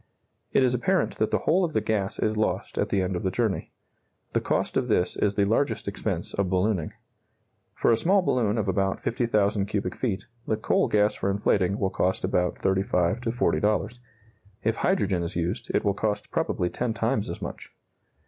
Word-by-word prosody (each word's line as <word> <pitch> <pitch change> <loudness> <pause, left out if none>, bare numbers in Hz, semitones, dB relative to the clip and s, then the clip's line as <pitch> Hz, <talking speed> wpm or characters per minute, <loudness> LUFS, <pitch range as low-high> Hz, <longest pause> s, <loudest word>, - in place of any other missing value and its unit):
It - - +4
is 125 -1 +3
apparent 180 +9 0
that 110 - +2
the - - +2
whole 180 +4 +2
of 165 -3 -1
the - - +3
gas 105 -2 -1
is 110 0 0
lost 110 0 -1
at - - 0
the 95 -2 +1
end 95 0 -2
of 90 - -2
the 95 - 0
journey. 110 -1 -1 0.6
The - - +2
cost - - -1
of - - +1
this 90 - +1
is 100 -1 0
the 100 - +3
largest 115 +7 0
expense - - -3
of 100 -2 0
ballooning. 95 -2 0 0.8
For - - +3
a 115 - +4
small 190 - +3
balloon 115 -8 +1
of 105 - -1
about 95 0 0
50,000 105 -4 +1
cubic 100 +1 -2
feet, 110 -7 -2 0.2
the 110 - +1
coal 110 - +2
gas 105 0 +3
for 100 - -2
inflating 100 -1 +1
will 95 -3 0
cost 95 +1 0
about 90 -1 +1
$35 95 +1 +1
to 120 - -2
$40. 110 -1 0 0.6
If 110 +1 +1
hydrogen 100 - +1
is 85 - -4
used, 90 +7 -2
it - - 0
will 100 - +3
cost 105 +1 -2
probably 90 -1 -1
ten 115 +3 -2
times 115 -1 0
as - - -5
much. - - -7
105 Hz, 195 wpm, -26 LUFS, 95-115 Hz, 0.8 s, It